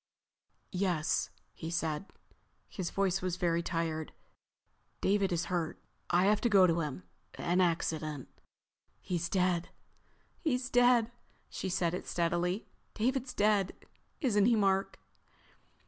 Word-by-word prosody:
"Yes," 180 -4 0 0.2
he 160 - -6
said. 165 +1 -2 0.6
His 185 -5 -4
voice 195 -1 0
was 185 -1 -1
very 170 -2 +1
tired. 165 -2 -2 0.9
"David 200 -1 +2
is 170 0 0
hurt. 170 -3 -2 0.3
I 175 +2 +4
have 210 +1 +3
to 240 - +2
go 195 -3 +7
to 170 -1 +2
him. 145 - -4 0.3
An 180 +2 +1
accident." 155 -4 -1 0.7
"He's 175 -2 -2
dead." 180 -2 +1 0.7
She 245 - +1
said 175 -2 0
it 180 - -4
steadily. 175 +3 0 0.3
"David's 255 +3 -1
dead, 205 -2 +2 0.5
isn't 210 -7 +3
he, 235 - +5
Mark?" 195 -2 +1
180 Hz, 115 wpm, -32 LUFS, 170-205 Hz, 0.9 s, go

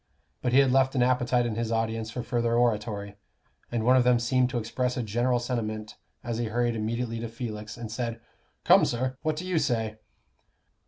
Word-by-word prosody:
But 125 - 0
he 130 - +4
had 135 -2 +5
left 130 +1 +3
an 125 - +3
appetite 125 -1 +2
in 115 - -1
his 115 +1 -2
audience 115 -1 -1
for 120 +1 -5
further 120 -2 0
oratory, 105 -4 0 0.5
and 115 -2 -1
one 125 +1 +6
of 130 - +5
them 125 0 +4
seemed 125 +1 +2
to 130 - -2
express 125 +2 -2
a 125 - -1
general 120 +3 +1
sentiment 110 -3 -3 0.3
as 120 -1 -3
he 120 - 0
hurried 120 +1 0
immediately 115 +1 -2
to 115 0 -4
Felix, 110 -2 -6
and 115 -2 -6
said, 115 0 -3 0.4
"Come, - - +6
sir, 130 +2 -1
what 155 -1 0
do 170 +4 -5
you 180 -3 +1
say?" 115 -6 -1
120 Hz, 200 wpm, -27 LUFS, 115-125 Hz, 0.5 s, one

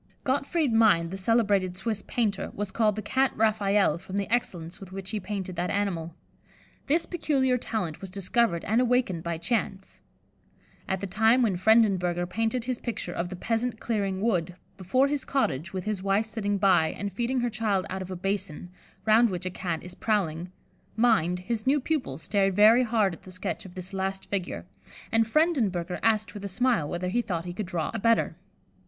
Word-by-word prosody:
'" - - -39
Gottfried 280 0 0
Mind, 205 -7 +4
the - - -4
celebrated 200 -3 +2
Swiss 210 +1 -2
painter, 215 -5 -1
was 205 -1 -3
called 215 -3 +2
the 215 - -4
"Cat 265 +5 +2
Raphael," 205 -6 +2
from 190 +3 -6
the 200 - -1
excellence 175 -8 -2
with 190 -2 -11
which 190 0 -6
he 215 - -1
painted 195 -3 -5
that 180 +1 -1
animal. 170 -5 -2 0.7
This 330 +4 +2
peculiar 275 -7 +1
talent 185 -10 -3
was 195 - -7
discovered 195 -1 0
and 225 +4 +2
awakened 245 -8 +1
by 170 0 -3
chance. 195 +1 -3 0.9
At 190 -1 -1
the - - -2
time 220 +6 +3
when 210 -5 +2
Frendenberger 185 -4 +3
painted 225 +6 -1
his 255 -1 -2
picture 220 -7 -4
of 175 +1 -3
the 185 - -6
"Peasant 225 +4 -2
Clearing 200 -4 -1
Wood," 180 -6 0 0.2
before 225 +9 +2
his 285 -1 -1
cottage, 190 - -1
with 190 -2 -4
his 210 -2 -2
wife 195 +3 +1
sitting 210 -2 -2
by, 190 -5 +4
and 200 +3 -4
feeding 240 +5 0
her 240 - 0
child 210 -4 0
out 190 0 -3
of 185 - -6
a 185 - -4
basin, 185 -2 -3 0.3
round 225 +2 +5
which 180 -1 -4
a 185 - -2
Cat 175 -3 -3
is 180 - -8
prowling, 180 -5 -1 0.4
Mind, 205 -7 +2
his 220 +4 -3
new 285 +2 +4
pupil, 270 - -2
stared 195 +3 0
very 215 +4 +7
hard 220 -6 +2
at - - -11
the 185 - -12
sketch 180 -2 -4
of 175 - -15
this 185 +1 -6
last 190 0 -3
figure, 185 - -3 0.5
and 225 0 +3
Frendenberger 220 - +1
asked 220 -1 +1
with 205 -2 -8
a 200 - -4
smile 230 - +1
whether 180 +1 -2
he 240 +6 +1
thought 170 -6 -3
he 175 - -5
could 200 +1 -4
draw 170 -3 -2
a 225 - -2
better. 230 +2 +2
200 Hz, 195 wpm, -27 LUFS, 180-225 Hz, 0.9 s, very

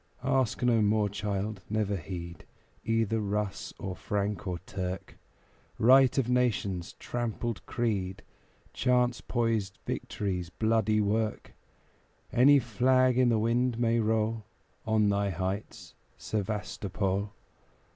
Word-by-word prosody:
Ask 130 -3 +1
no 120 -2 +4
more, 105 0 +2
child. 100 0 -3
Never 105 -1 0
heed 85 -1 -7 0.4
Either 115 -1 +1
Russ, 105 -1 -2
or 95 -1 -5
Frank, 100 +1 -2
or 90 -1 -2
Turk; 95 -1 -5 0.6
Right 130 +3 +6
of 130 -4 +2
nations, 120 -7 0
trampled 120 -2 -4
creed, 100 -6 -2 0.5
Chance 125 -1 +2
poised 115 -5 -1
victory's 90 -4 -3
bloody 110 +1 +1
work; 110 +1 -1 0.8
Any 135 +4 +7
flag 130 +1 +3
i' 130 - +5
the 115 -2 +3
wind 120 +2 +1
may 115 -1 +2
roll 110 0 0 0.4
On 110 -1 +3
thy 100 0 +1
heights, 95 +3 -4 0.2
Sevastopol! 100 -1 -2
110 Hz, 110 wpm, -29 LUFS, 100-120 Hz, 0.8 s, Any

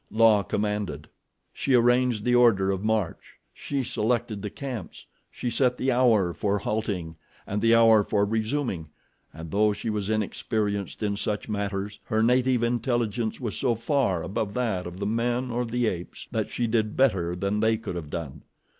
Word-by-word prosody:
La 110 -2 +5
commanded. 100 -6 -2 0.5
She 135 - +1
arranged 120 -2 +3
the 125 - +2
order 110 -6 +4
of 95 0 -3
march, 110 -5 -2 0.2
she 140 -2 -3
selected 120 -3 -1
the 105 - -4
camps, 125 - -7 0.2
she 120 - -4
set 125 +1 +2
the 130 - +1
hour 115 -8 +3
for 100 +2 0
halting 100 -6 -3 0.3
and 105 +1 -2
the 115 0 +5
hour 115 -2 +6
for 100 0 +1
resuming 110 - -2 0.4
and 80 +1 -9
though 105 +1 +3
she 110 +2 -3
was 105 -1 -2
inexperienced 105 -1 -2
in 100 -1 0
such 105 0 -2
matters, 100 -1 -3
her 110 0 +1
native 125 0 +3
intelligence 120 -2 -1
was 115 -5 -3
so 125 -4 +1
far 115 - 0
above 100 +1 -3
that 110 -8 -1
of 90 +1 -8
the 100 - -3
men 120 +3 0
or 120 +1 -1
the 120 +1 -1
apes 90 -5 -4
that - - -1
she 120 - -1
did 110 -2 0
better 95 -10 +2
than 100 +3 -1
they 110 +1 +2
could 110 -4 -6
have 80 -4 -6
done. 75 -4 -6
110 Hz, 170 wpm, -26 LUFS, 100-120 Hz, 0.5 s, hour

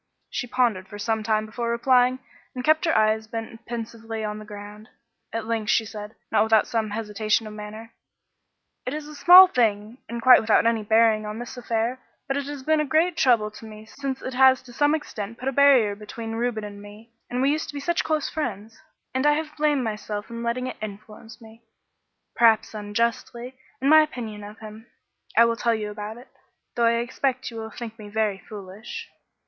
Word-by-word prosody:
She 245 - -3
pondered 235 -7 0
for 205 - -9
some 220 +1 -1
time 215 0 0
before 235 +2 -4
replying, 250 +1 +3 0.4
and 250 - -4
kept 310 +4 +3
her 325 - +2
eyes 215 0 +2
bent 225 +1 -7
pensively 225 -1 -5
on 210 0 -4
the 215 - -10
ground. 210 +1 -10 0.4
At 225 -1 -3
length 220 -1 -2
she 225 - +3
said, 210 0 -8 0.2
not - - +4
without 220 0 +4
some 225 -2 -1
hesitation 215 +1 -1
of 215 - -8
manner 215 +2 -9 0.9
"It 255 +3 -4
is 305 -1 -6
a 300 - -10
small 360 +5 +9
thing 225 - 0
and 235 0 -4
quite 255 +2 +7
without 220 +1 +3
any 230 -1 +2
bearing 220 0 +3
on 210 +1 -5
this 240 +2 -7
affair. 235 0 -2 0.3
But 270 - -1
it 280 -1 -3
has 285 -2 -6
been 315 +2 +2
a - - +2
great 320 +4 +2
trouble 230 -8 +3
to 215 - -12
me 215 0 -11
since 270 +3 -5
it 260 - -4
has 260 0 +5
to 245 -1 -14
some 290 +4 +3
extent 230 -7 -6
put 255 - -6
a - - +2
barrier 270 -6 +5
between 225 +2 -7
Reuben 225 -1 -2
and 205 -1 -8
me; 210 +3 -14 0.2
and 245 - -2
we 270 +2 +3
used 310 +2 -2
to 290 - -8
be - - -3
such 340 +4 0
close 310 -2 0
friends. 225 -3 -5 0.3
And 260 +3 +1
I 295 - +5
have 305 0 -3
blamed 295 -3 +1
myself 210 -1 -4
for 235 - -12
letting 235 +2 -2
it 255 - -5
influence 215 +1 -9
me 225 0 -16 0.7
perhaps 225 -2 +4
unjustly 235 +4 -2 0.2
in 270 - -1
my 310 +2 +8
opinion 230 -9 -5
of 210 +1 -10
him. 220 +2 -11 0.5
I 235 - +8
will 230 0 +1
tell 230 +1 +1
you 210 -1 -4
about 210 +1 -7
it, 250 +2 -14 0.5
though 235 - +2
I 230 - +4
expect 250 +2 -2
you 230 - -9
will 220 0 -5
think 225 +1 -8
me 210 -1 -9
very 210 -2 -1
foolish. 210 - -9
230 Hz, 205 wpm, -24 LUFS, 215-255 Hz, 0.9 s, small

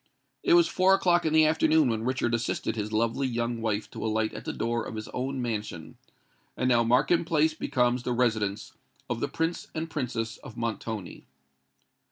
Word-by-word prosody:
It 345 - +4
was 345 -1 +6
four 190 +1 +4
o'clock 175 -3 +2
in 155 - 0
the 160 0 +6
afternoon 155 -1 +3
when 110 -1 -1
Richard 125 -1 0
assisted 115 0 -1
his 105 -1 -3
lovely 115 +5 +1
young 120 -1 -2
wife 105 -2 -1
to - - -6
alight 110 0 0
at - - -8
the - - -2
door 115 0 -1
of - - -7
his 110 0 -5
own 130 +1 -3
mansion; 105 -8 -4 0.6
and 130 - 0
now 120 -2 +4
Markham 130 +9 +3
Place 160 -2 +2
becomes 125 -4 0
the 125 - -3
residence 110 -4 0 0.4
of - - -1
the - - -1
Prince 165 +1 -2
and 160 +1 -3
Princess 115 -6 -3
of 120 - -12
Montoni. 110 -3 -5
120 Hz, 185 wpm, -27 LUFS, 110-155 Hz, 0.6 s, was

